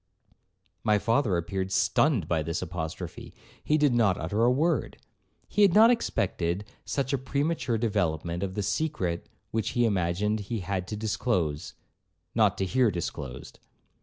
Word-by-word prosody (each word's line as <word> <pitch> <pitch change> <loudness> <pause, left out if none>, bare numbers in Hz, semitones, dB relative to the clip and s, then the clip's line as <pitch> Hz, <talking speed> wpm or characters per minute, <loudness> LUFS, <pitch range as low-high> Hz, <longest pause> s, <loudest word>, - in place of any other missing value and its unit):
My 105 -1 +4
father 115 -2 +1
appeared 95 +3 -3
stunned 95 - +2
by 80 -2 +1
this 80 +4 -3
apostrophe. 90 0 -6 0.3
He 155 - +2
did 145 -4 +3
not 110 -6 +3
utter 100 +8 -1
a 120 - +5
word. 150 +1 +1 0.5
He 210 - 0
had 195 -4 +5
not 225 +3 +8
expected 95 - -1 0.2
such 140 0 -1
a 140 - +1
premature 140 -2 -1
development 85 -6 -1
of 95 -1 -3
the 105 - -1
secret 95 - -2 0.2
which 110 0 -1
he 120 - +4
imagined 100 +1 0
he 105 +1 -4
had 90 0 -3
to 105 - -4
disclose, 100 - -1 0.6
not 105 -4 +3
to 95 - 0
hear 125 +4 +3
disclosed. 75 -8 -6
100 Hz, 150 wpm, -28 LUFS, 90-125 Hz, 0.6 s, not